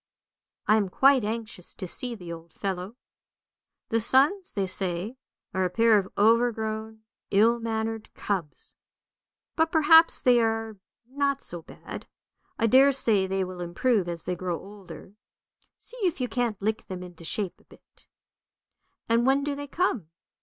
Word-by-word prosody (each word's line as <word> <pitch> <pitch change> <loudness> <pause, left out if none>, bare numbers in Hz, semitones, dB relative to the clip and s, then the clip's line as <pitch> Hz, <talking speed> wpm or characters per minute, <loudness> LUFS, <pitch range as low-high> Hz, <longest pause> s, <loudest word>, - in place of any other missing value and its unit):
I 215 - +4
am 200 -3 0
quite 270 +4 +4
anxious 215 -3 -5
to 185 - -6
see 245 +6 -5
the 175 -5 -8
old 165 0 -12
fellow. 195 +2 -4 0.9
The 225 - +1
sons, 285 - +4
they 200 -2 0
say, 185 +3 -2 0.4
are 190 -1 0
a 180 - +1
pair 225 +2 +4
of 195 -1 -6
overgrown, 220 0 +1 0.3
ill 225 +4 +3
mannered 225 -1 -3
cubs; 180 -8 -4 0.8
but 325 -1 +1
perhaps 320 +1 +6
they 245 -2 +4
are 225 -1 -1 0.3
not 280 +1 -1
so 175 -1 -7
bad; - - -10 0.5
I 230 - +1
daresay 255 -5 +4
they 190 0 -1
will 180 -1 -7
improve 180 +3 0
as 170 -1 -6
they 180 - -1
grow 175 -1 -3
older. 200 -1 -12 0.6
See - - -12
if 365 -9 -1
you 250 - -1
can't 240 -5 -2
lick 220 +2 -2
them 185 -1 -6
into 175 -2 -12
shape 190 +3 -3
a - - -29
bit." - - -22 0.5
" - - -52
And 230 +2 +2
when 275 +1 +3
do 290 0 -2
they 285 0 -6
come? 275 - -1
220 Hz, 155 wpm, -26 LUFS, 190-250 Hz, 0.9 s, perhaps